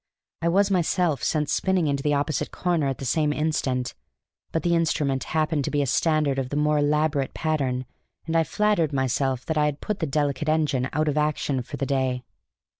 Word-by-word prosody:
I 170 - +1
was 200 +3 +3
myself 175 -5 +1
sent 150 -2 0
spinning 190 0 +1
into 140 -2 0
the 145 0 +1
opposite 145 0 -1
corner 170 -5 0
at 135 -2 -2
the 135 - -6
same 150 +4 +1
instant. 145 -5 -1 0.6
But 160 - -1
the 175 - +2
instrument 150 -5 +1
happened 155 -2 0
to - - -1
be 145 -1 +1
a - - -1
standard 150 0 +1
of 130 -1 -3
the 145 - -4
more 150 0 +2
elaborate 145 -1 +1
pattern, 135 -5 -1 0.4
and 165 0 -2
I 165 - +5
flattered 175 -5 +1
myself 130 -1 0
that 160 -3 0
I 150 - +3
had 150 -1 -1
put 210 -2 -3
the 160 - -1
delicate 145 +1 0
engine 145 -5 +1
out 155 0 0
of 150 0 +1
action 150 -3 0
for 140 +4 -7
the 140 - -1
day. 130 -2 0
150 Hz, 200 wpm, -25 LUFS, 135-160 Hz, 0.6 s, I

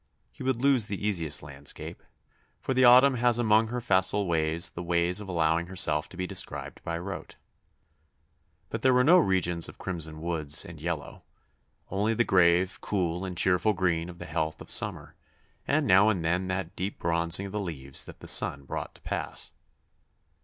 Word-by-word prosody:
He - - -15
would 130 -1 -1
lose 135 -6 +3
the 100 -1 -4
easiest 85 -9 0
landscape 70 0 -6 0.6
for 130 - -2
the 130 0 +3
autumn 130 +2 +7
has 120 0 +2
among 110 -1 +3
her 125 +2 -3
facile 100 -3 +2
ways 80 0 0
the 85 - -7
way 85 0 +1
of 100 +2 -4
allowing 85 -1 +1
herself 75 -5 0
to 90 - -12
be 95 - -2
described - - -4
by 85 0 -3
rote. 100 +4 -7 1.4
But - - -4
there 130 -1 +4
were 125 - +4
no 175 +7 +6
regions 90 - +1
of - - -13
crimson 80 -3 -5
woods 80 -2 0
and 85 -3 -11
yellow 80 -3 -5 0.7
only 105 +4 0
the 120 - +3
grave, 90 -1 +2
cool, 90 -3 -2
and 90 -2 -6
cheerful 95 +4 +2
green 90 -3 -1
of 90 - -10
the - - -8
health 80 0 -3
of - - -7
summer, - - 0 0.5
and 150 +1 +1
now 100 -1 +5
and 90 -6 -1
then 90 +3 0
that 95 -1 -4
deep 95 +3 -4
bronzing 85 +3 +2
of 100 - -7
the 105 - -3
leaves 70 -8 -5
that - - -13
the - - -10
sun 70 - +2
brought - - -6
to - - -19
pass. - - -4
90 Hz, 180 wpm, -27 LUFS, 85-105 Hz, 1.4 s, autumn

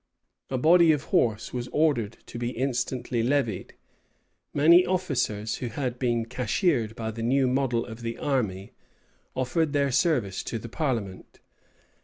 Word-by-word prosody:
A 130 - -1
body 165 +4 +6
of 150 -3 0
horse 110 -2 +1
was 125 -1 -3
ordered 130 -9 +1
to 120 - -8
be 120 0 -1
instantly 125 -1 -2
levied. 120 -5 -1 0.8
Many 170 +5 +6
officers, 130 - -1
who 125 - -4
had 125 +1 -3
been 120 -3 0
cashiered 125 - 0
by 110 -1 -4
the 115 +1 -7
new 130 +4 +2
model 125 -2 0
of 115 0 -9
the 115 0 -4
army, 105 -9 -2 0.6
offered 145 +4 0
their 140 -1 +2
service 125 - +1
to 115 - -3
the 115 +1 -8
parliament. 115 - -3
125 Hz, 145 wpm, -26 LUFS, 115-140 Hz, 0.8 s, body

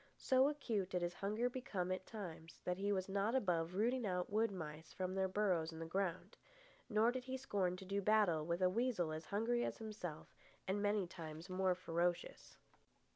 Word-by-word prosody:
So 260 +1 +4
acute 225 -10 -1
did 180 -2 0
his 175 0 -1
hunger 210 +6 0
become 210 -8 -2
at 185 0 -3
times 170 -7 -7
that 180 +1 -1
he 200 +1 +1
was 190 -2 0
not 200 +4 +1
above 180 -7 +1
rooting 240 +5 +2
out 180 0 -1
wood 220 +2 +3
mice 160 -4 -6
from 185 0 -2
their 190 0 +2
burrows 185 -5 +1
in 160 - -8
the 165 - -4
ground. 185 +1 -2 0.5
Nor 220 +1 +4
did 255 0 -4
he 260 0 -3
scorn 195 -9 0
to 190 - -9
do 200 +1 0
battle 200 -6 +4
with 170 +3 0
a 180 - +6
weasel 220 -7 +1
as 155 +1 -4
hungry 235 +4 +1
as - - -2
himself 205 -8 -6 0.3
and 195 +2 +1
many 205 -1 +2
times 165 -1 -8
more 185 0 +2
ferocious. 175 0 -1
190 Hz, 190 wpm, -39 LUFS, 175-215 Hz, 0.5 s, a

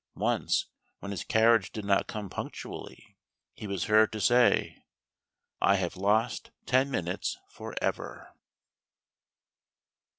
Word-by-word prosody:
Once, - - +1 0.3
when 100 - -7
his 100 - -4
carriage 110 -3 +3
did 105 -2 -6
not 100 -1 +2
come 105 -2 -5
punctually, - - -8 0.3
he 105 - -8
was 100 -3 -2
heard 110 0 +4
to 110 - -5
say: 120 +4 +3 0.8
"I 100 - +5
have 95 -2 -2
lost 105 +5 +1 0.2
ten 130 +2 +3
minutes 90 -8 -2
for - - -9
ever." - - -4
105 Hz, 120 wpm, -29 LUFS, 100-115 Hz, 0.8 s, I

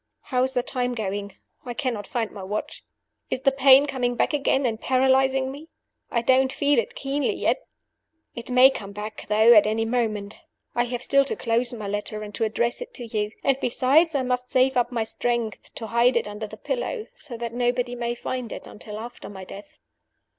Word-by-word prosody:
"How 250 -2 -1
is 260 +1 0
the 250 -2 +1
time 250 -1 -2
going? 200 -2 -4 0.3
I 245 -2 -6
cannot 235 -7 -2
find 230 -3 -2
my 200 - -9
watch. 205 +3 -5 0.5
Is 255 - -2
the 275 - +4
pain 270 +1 +6
coming 250 -4 -1
back 250 - +1
again 275 -2 +1
and 225 -2 -1
paralyzing 265 0 +2
me? 295 +4 -10 0.4
I 235 -1 0
don't 260 +1 +4
feel 285 -2 +2
it 230 - -3
keenly 275 +1 -1
yet. - - -1 0.7
"It 235 - -8
may 250 +2 +7
come 200 -5 -7
back, 210 +1 -7
though, 220 +3 +6
at 210 -2 +6
any 220 +1 0
moment. 220 -4 -2 0.3
I 240 0 +1
have 245 0 -4
still 275 +2 +4
to - - -2
close 235 +1 +1
my 215 -4 -6
letter 205 +1 -3
and 210 0 -8
to 225 - 0
address 235 - -1
it - - -8
to 245 - -6
you. 215 -1 -2
And, 270 -1 +2
besides, 285 +6 +3
I 270 - +1
must 250 0 -1
save 260 +1 +3
up 245 0 +1
my 235 -2 0
strength 230 -1 -3
to 225 - -5
hide 235 +2 +3
it 235 - -1
under 210 +1 -6
the - - -11
pillow, - - -3
so 300 - -7
that 235 0 -5
nobody 245 0 0
may 240 -1 -2
find 250 -1 -4
it - - -7
until 210 0 -9
after 235 +3 -8
my 190 -2 -9
death. 200 +2 -11
245 Hz, 205 wpm, -24 LUFS, 220-265 Hz, 0.7 s, may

